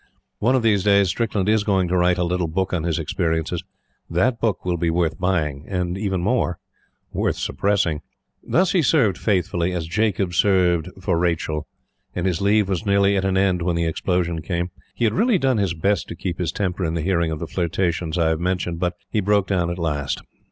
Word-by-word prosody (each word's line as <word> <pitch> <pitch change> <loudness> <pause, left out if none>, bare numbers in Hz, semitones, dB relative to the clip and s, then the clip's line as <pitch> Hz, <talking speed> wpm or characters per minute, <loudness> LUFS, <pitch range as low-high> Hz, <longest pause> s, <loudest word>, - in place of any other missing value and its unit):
One 120 +5 +3
of 125 - +1
these 105 -4 +3
days, 100 -2 +4
Strickland 105 -2 -1
is 110 -1 +3
going 95 -3 +1
to 90 - +1
write 90 0 +3
a 90 - +1
little 90 0 0
book 95 +4 -2
on 85 -3 -1
his 85 -2 0
experiences. 80 0 -1 0.5
That 115 +8 +1
book 110 -6 0
will 90 -1 0
be 85 0 0
worth 85 +1 0
buying; 80 -6 -1
and 90 -2 -2
even 95 -2 -1
more, 95 -3 0 0.6
worth - - 0
suppressing. 90 -7 0 0.4
Thus, 185 +1 +2
he 180 - +3
served 135 - +2
faithfully 90 -3 0
as 85 -3 -2
Jacob 95 0 0
served 90 -2 +3
for 90 -2 0
Rachel; 80 -3 -1 0.5
and 90 - -2
his 90 -2 0
leave 100 0 +3
was 95 0 -1
nearly 100 -1 +3
at 95 -1 0
an 95 -1 +1
end 95 -2 +2
when 85 0 0
the 85 0 0
explosion 85 0 -1
came. 85 +2 -2 0.2
He - - -2
had 110 - +2
really 225 +2 +3
done 130 -7 +1
his 95 -4 0
best 100 +5 0
to - - -7
keep 90 -2 -4
his 85 -3 -1
temper 95 -1 -2
in 80 -1 -1
the 80 - -2
hearing 85 -2 +1
of 80 - -3
the 85 - -4
flirtations 85 -1 -1
I 80 -2 +3
have 80 -1 0
mentioned; 90 -1 -1
but 90 0 -1 0.2
he 110 - +1
broke 100 0 +2
down 90 -4 0
at 85 - -3
last. 75 -5 -2
90 Hz, 210 wpm, -22 LUFS, 85-100 Hz, 0.6 s, days